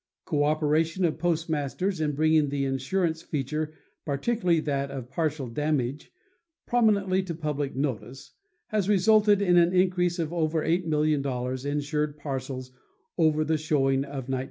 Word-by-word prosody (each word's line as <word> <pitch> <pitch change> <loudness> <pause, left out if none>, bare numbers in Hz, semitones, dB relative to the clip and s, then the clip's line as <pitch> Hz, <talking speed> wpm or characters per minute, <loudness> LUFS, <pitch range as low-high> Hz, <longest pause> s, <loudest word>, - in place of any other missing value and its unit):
Cooperation 155 +4 +1
of 160 -1 -1
postmasters 165 +1 -1
in 150 -1 0
bringing 155 0 +3
the 140 -1 -1
insurance 160 +5 -1
feature 150 +2 -3 0.3
particularly 170 - +1
that 140 -2 -1
of 130 -2 -7
partial 150 -4 -1
damage 140 +1 -2 0.5
prominently 200 -5 +2
to 180 -3 -5
public 150 -3 -3
notice, 130 -2 -4 0.4
has 210 -3 0
resulted 205 +1 +4
in 175 -2 +4
an 175 +1 +4
increase 180 -1 +2
of 165 -1 -2
over 160 -2 0
8,000,000 145 -6 0
insured 150 +1 -1
parcels 135 -3 -5 0.5
over 155 -1 +3
the 155 0 +1
showing 135 -3 +1
of 135 -2 -5
1916. 130 -1 -1
155 Hz, 130 wpm, -27 LUFS, 140-170 Hz, 0.5 s, resulted